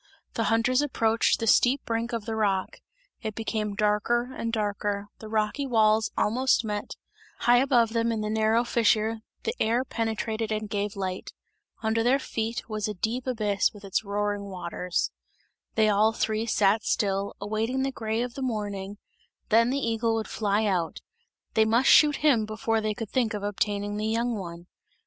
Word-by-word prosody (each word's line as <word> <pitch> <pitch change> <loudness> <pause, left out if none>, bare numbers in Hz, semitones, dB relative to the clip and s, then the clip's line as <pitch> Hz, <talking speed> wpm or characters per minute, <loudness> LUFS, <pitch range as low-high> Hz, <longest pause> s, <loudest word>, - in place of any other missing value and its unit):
The 225 - -1
hunters 235 +4 +2
approached 230 -6 +1
the 225 - -1
steep 250 +4 +3
brink 230 +1 -2
of 230 -3 -3
the 225 - -3
rock; 200 -3 0 0.4
it 220 -2 -4
became 215 -2 -2
darker 225 +4 +1
and 230 - -3
darker, 205 -2 -2
the 220 - -9
rocky 220 +6 0
walls 220 -2 +3
almost 250 +1 +2
met; 210 -1 -4 0.5
high 240 0 +5
above 245 -4 +3
them 230 0 +1
in 220 -1 -2
the 210 - -2
narrow 220 +2 +2
fissure 225 -1 +2 0.2
the 455 - -1
air 235 +4 +2
penetrated 225 -1 -2
and 215 0 -2
gave 205 0 -2
light. 190 -1 -4 0.5
Under 220 +1 +1
their 245 +4 +4
feet 230 -4 -3
there - - -28
was 215 -1 -1
a 210 - -4
deep 235 +7 -2
abyss 210 -5 +1
with 205 - -13
its 195 +2 -1
roaring 205 0 -2
waters. 180 -2 -3 0.6
They 220 -1 +4
all 215 +2 +3
three 220 0 -1
sat 215 0 +3
still, 200 -2 0
awaiting 220 +6 -1
the 270 - -1
grey 225 -1 -2
of 245 -1 -5
the 270 - -7
morning; 205 -5 -3 0.5
then 230 +2 +4
the 270 - 0
eagle 230 -3 0
would 220 -1 -2
fly 210 0 0
out; 180 -5 -1 0.5
they 220 - +4
must 230 +4 +3
shoot 295 -1 +7
him 235 -8 +4
before 220 +1 -1
they 215 -1 -1
could 225 -2 -6
think 235 -4 +1
of 205 - -5
obtaining 205 0 -1
the 215 +1 -1
young 230 +2 0
one. 170 -3 -7
220 Hz, 175 wpm, -27 LUFS, 205-230 Hz, 0.6 s, shoot